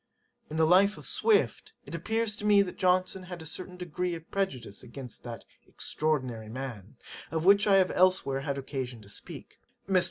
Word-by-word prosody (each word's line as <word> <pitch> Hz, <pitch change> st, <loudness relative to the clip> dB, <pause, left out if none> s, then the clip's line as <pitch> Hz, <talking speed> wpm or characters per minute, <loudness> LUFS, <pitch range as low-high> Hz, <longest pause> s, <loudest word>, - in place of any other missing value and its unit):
In 155 Hz, -, -4 dB
the 160 Hz, -, +5 dB
Life 190 Hz, +5 st, +5 dB
of -, -, -11 dB
SWIFT, 440 Hz, -2 st, +1 dB
it -, -, -10 dB
appears 220 Hz, +6 st, -1 dB
to -, -, -8 dB
me 205 Hz, -1 st, +6 dB
that 180 Hz, -, -8 dB
Johnson 185 Hz, +1 st, +2 dB
had 180 Hz, -1 st, -8 dB
a 160 Hz, -, -9 dB
certain 180 Hz, +3 st, -7 dB
degree 180 Hz, 0 st, -2 dB
of 165 Hz, 0 st, -11 dB
prejudice 135 Hz, -, -2 dB
against 125 Hz, 0 st, -9 dB
that 120 Hz, -2 st, -8 dB, 0.2 s
extraordinary 130 Hz, -8 st, -2 dB
man, 115 Hz, -4 st, -7 dB, 0.3 s
of 160 Hz, 0 st, -2 dB
which 200 Hz, +2 st, +6 dB
I 200 Hz, -, +6 dB
have 190 Hz, -1 st, +4 dB
elsewhere 185 Hz, -7 st, +3 dB
had 140 Hz, -1 st, -2 dB
occasion 130 Hz, -4 st, -5 dB
to 100 Hz, -, -14 dB
speak. -, -, -9 dB, 0.3 s
Mr. 190 Hz, -1 st, +4 dB
170 Hz, 185 wpm, -29 LUFS, 135-190 Hz, 0.3 s, me